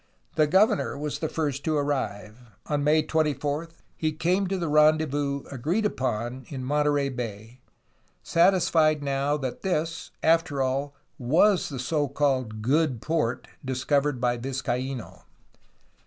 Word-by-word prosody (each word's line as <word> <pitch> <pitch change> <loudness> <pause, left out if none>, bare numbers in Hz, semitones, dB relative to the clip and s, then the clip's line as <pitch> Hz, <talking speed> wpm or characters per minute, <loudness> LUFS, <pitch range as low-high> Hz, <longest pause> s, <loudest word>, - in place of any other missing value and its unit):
The 155 - +3
governor 185 -6 +3
was 150 0 -4
the 160 - -2
first 145 -3 -2
to 155 -2 +1
arrive. 125 -7 -2 0.3
On 145 -1 -1
May 155 +1 +4
24 150 0 -1 0.3
he 155 -1 -1
came 180 +5 0
to 190 +1 -1
the 170 -2 -2
rendezvous 150 -2 +2
agreed 160 - -1
upon 125 - -2
in 135 -3 -5
Monterey 145 0 +1
Bay, 115 -1 -6 0.6
satisfied 165 - +3
now 140 +1 0
that 130 -4 -5
this, 165 -3 -2
after 165 -3 +2
all, 135 +2 -1 0.2
was 170 +10 +3
the 140 - -6
so 145 +4 0
called 130 -6 -1
good 140 0 +2
port 150 -3 -1 0.2
discovered 135 +1 0
by 120 0 +1
Vizcaino. 130 -1 -4
145 Hz, 130 wpm, -26 LUFS, 130-155 Hz, 0.6 s, May